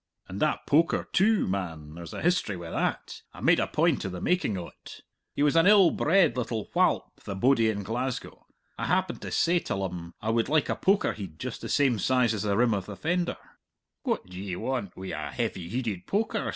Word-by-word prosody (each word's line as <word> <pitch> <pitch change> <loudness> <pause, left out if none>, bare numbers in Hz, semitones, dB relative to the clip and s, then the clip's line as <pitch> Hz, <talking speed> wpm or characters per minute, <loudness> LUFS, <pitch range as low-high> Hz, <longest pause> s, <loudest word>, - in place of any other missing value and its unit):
"And 95 - -6
that 155 - 0
poker, 160 +3 +2
too; 210 +2 +3
man, 80 -6 -4
there's 85 0 -9
a - - -6
history 165 - +1
wi' 85 -1 -8
that. - - -2
I - - -10
made - - +4
a - - +1
point - - +1
of 95 - -3
the 90 - -5
making 145 - 0
o't. 85 -2 -10 0.3
He 145 - +1
was 150 +1 +3
an 165 +2 +5
ill 200 -4 +7
bred 165 -5 +3
little 115 -3 -3
whalp, - - +1
the 100 - -4
bodie 115 +2 +3
in 100 -2 -2
Glasgow. 125 +5 -4 0.3
I - - -2
happened 185 0 0
to - - -5
say 175 +1 +2
till 100 -10 -3
um 85 -2 -6
I 110 - -1
would 115 +2 +1
like 155 0 +2
a - - +1
poker 195 +2 +2
heid 95 -7 -8
just - - -6
the - - -6
same 130 -6 +2
size 125 +2 +2
as 105 - -2
the 100 -2 0
rim 120 -1 +3
of 100 -3 -3
the 105 - -6
fender! 175 - -1 0.6
'What - - -1
d'ye 90 0 -6
want 125 -1 -3
wi' 95 0 -6
a - - -4
heavy 85 -2 -3
heided 110 -5 -3
poker?' 215 +3 -1
115 Hz, 215 wpm, -27 LUFS, 95-155 Hz, 0.6 s, ill